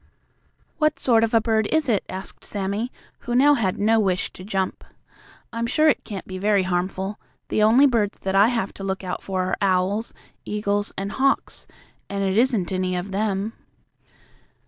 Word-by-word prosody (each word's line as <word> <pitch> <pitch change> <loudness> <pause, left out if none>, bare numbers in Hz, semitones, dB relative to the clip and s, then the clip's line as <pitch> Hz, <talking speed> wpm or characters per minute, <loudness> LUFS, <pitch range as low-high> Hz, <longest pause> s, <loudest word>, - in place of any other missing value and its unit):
"What 305 0 +2
sort 230 -3 +3
of 225 - +1
a 230 - +5
bird 220 -1 +1
is 315 -2 +1
it?" 220 -5 +1
asked 190 0 -5
Sammie, 205 +4 -3 0.3
who 240 - -3
now 285 +4 +6
had 200 -9 0
no 220 +2 +3
wish 190 -3 0
to 185 - -10
jump. 190 -2 -2 0.7
"I'm 230 0 -1
sure 310 +5 +4
it 290 - +1
can't 200 -4 -7
be 185 -1 -6
very 200 -1 +2
harmful. 190 +2 -2 0.3
The - - +1
only 230 +6 +6
birds 225 -7 +1
that 190 - -3
I 200 +2 +6
have 230 -5 -1
to 195 - -9
look 195 0 -3
out 180 -1 -4
for 190 -1 -2
are 185 - -1
owls, 195 +3 +1 0.3
eagles 205 -1 -1
and 195 +1 -3
hawks, 270 +3 0 0.4
and 200 0 -2
it 190 0 0
isn't 225 -6 +2
any 185 -1 -1
of 180 +2 -4
them." 205 +1 -1
205 Hz, 180 wpm, -23 LUFS, 190-230 Hz, 0.7 s, now